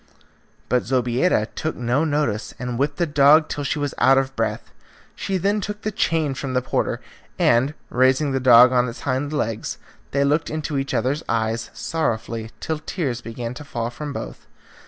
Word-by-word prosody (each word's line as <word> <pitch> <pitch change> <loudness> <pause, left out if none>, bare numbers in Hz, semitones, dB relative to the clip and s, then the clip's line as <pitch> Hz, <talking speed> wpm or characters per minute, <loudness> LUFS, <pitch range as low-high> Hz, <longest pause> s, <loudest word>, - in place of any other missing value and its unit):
But 125 - +2
Zobeida 125 +1 +2
took 155 - -3
no 125 +5 0
notice, 145 -9 -1
and 125 -1 -4
whipped 145 +1 0
the 175 - +2
dog 150 +1 +5
till 145 - -4
she 140 - -1
was 145 -1 -2
out 135 0 +5
of 135 0 0
breath. 115 -1 -2 0.4
She 195 - -2
then 200 +3 +1
took 210 +2 -5
the 215 - -1
chain 165 -8 0
from 130 0 -4
the 125 - +3
porter, - - -1 0.4
and, 130 +6 +3 0.2
raising 130 +3 +3
the 135 - 0
dog 125 -1 +7
on 125 -1 +2
its 115 - -9
hind 140 +2 -1
legs, 115 -8 -2 0.3
they 140 0 +1
looked 150 +3 +1
into 155 -2 -2
each 135 +1 -3
other's 135 +6 0
eyes 115 0 -1
sorrowfully 115 -7 -2
till 160 -1 -3
tears 140 -7 -3
began 115 +1 -5
to 145 +4 -9
fall 120 -4 -4
from 145 +4 -6
both. - - -7
135 Hz, 180 wpm, -22 LUFS, 120-150 Hz, 0.4 s, dog